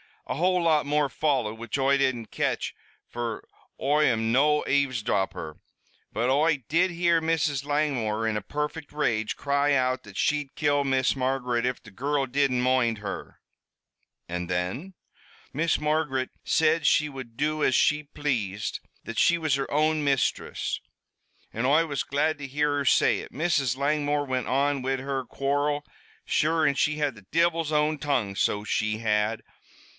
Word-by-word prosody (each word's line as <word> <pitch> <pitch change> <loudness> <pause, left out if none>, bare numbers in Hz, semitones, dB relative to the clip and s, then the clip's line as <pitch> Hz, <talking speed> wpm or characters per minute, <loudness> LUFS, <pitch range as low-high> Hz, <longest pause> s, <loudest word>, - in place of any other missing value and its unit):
"A - - -3
whole 180 +3 +2
lot 155 -3 +3
more 145 0 +1
followed, 130 -6 0
which 115 +3 -3
Oi 135 +1 +3
didn't 130 -5 0
catch, - - -1 0.3
fer 120 -2 -5 0.4
Oi 150 +3 +3
am 115 -3 +1
no 150 +4 +3
avesdropper. 115 - -1 0.5
But 120 +3 0
Oi 145 0 +2
did 175 +5 +3
hear 170 -1 +2
Mrs. 155 -4 0
Langmore, 130 -7 0
in 110 -1 0
a - - -3
perfect 150 +7 -4
rage, 115 -7 0
cry 140 +1 +1
out 130 -1 +1
that 100 -2 -13
she'd 145 -2 0
kill 145 -2 +1
Miss 130 0 +1
Margaret 125 -2 0
if 125 -1 -2
the 110 - -13
girrul 140 +6 -1
didn't 130 -1 +1
moind 125 -3 +2
her." 100 -1 -7 0.9
"And 90 0 -4
then?" 95 - -3 0.6
"Miss 160 +3 +1
Margaret 150 -4 0 0.2
said 160 -1 +2
she 150 -1 +3
would 130 -5 -9
do 155 +3 -1
as 130 - +3
she 150 0 +3
pl'ased 120 -9 -2 0.2
that 115 - -4
she 170 - +4
was 155 -4 +1
her 135 -1 -3
own 155 +1 +2
mistress 140 -3 -1 0.7
an' 115 +3 -2
Oi 155 +5 +4
was 145 -4 -2
glad 150 +3 0
to 145 -1 -6
hear 145 +1 0
her 140 - -1
say - - +4
it. - - -10
Mrs. 140 -5 +1
Langmore 145 +1 0
went 130 -2 -2
on 140 +1 +1
wid 130 0 -1
her 135 -1 -3
quarrel 145 +4 -1 0.4
sure, 160 +1 +2
an' 145 - +3
she 150 +2 +1
had 145 -4 -1
the 105 -3 -15
divil's 165 -1 +1
own 150 0 +1
tongue, 125 -9 0
so 105 +1 0
she 110 0 -1
had. 105 0 0
140 Hz, 160 wpm, -26 LUFS, 120-150 Hz, 0.9 s, she